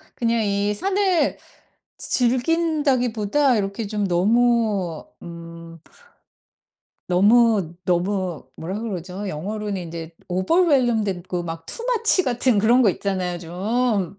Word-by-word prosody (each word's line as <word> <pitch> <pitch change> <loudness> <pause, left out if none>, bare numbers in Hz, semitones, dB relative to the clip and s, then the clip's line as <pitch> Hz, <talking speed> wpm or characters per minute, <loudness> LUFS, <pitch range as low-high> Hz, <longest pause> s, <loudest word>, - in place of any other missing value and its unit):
그냥 230 -1 0
이 200 0 0
산을 380 - +1 0.6
즈 245 -2 +1
즐긴다기보다 265 -4 +1
이렇게 200 +2 -3
좀 205 -1 -2
너무 205 -2 +1 0.2
음 170 -1 -10 1.3
너무 205 -1 +3
너무 180 -1 -1
뭐라 185 +5 -5
그러죠? 195 -2 -5
영어로는 205 +6 -4
인제 165 -1 -8
overwhelmed 240 - +2
됐고 180 -2 -3
막 165 -1 -7
too 470 - -6
much 455 -6 +3
같은 245 -2 +2
그런 235 +5 +4
거 235 - +5
있잖아요, 185 -2 -3
좀. 195 +3 -1
205 Hz, 275 characters per minute, -22 LUFS, 180-245 Hz, 1.3 s, 거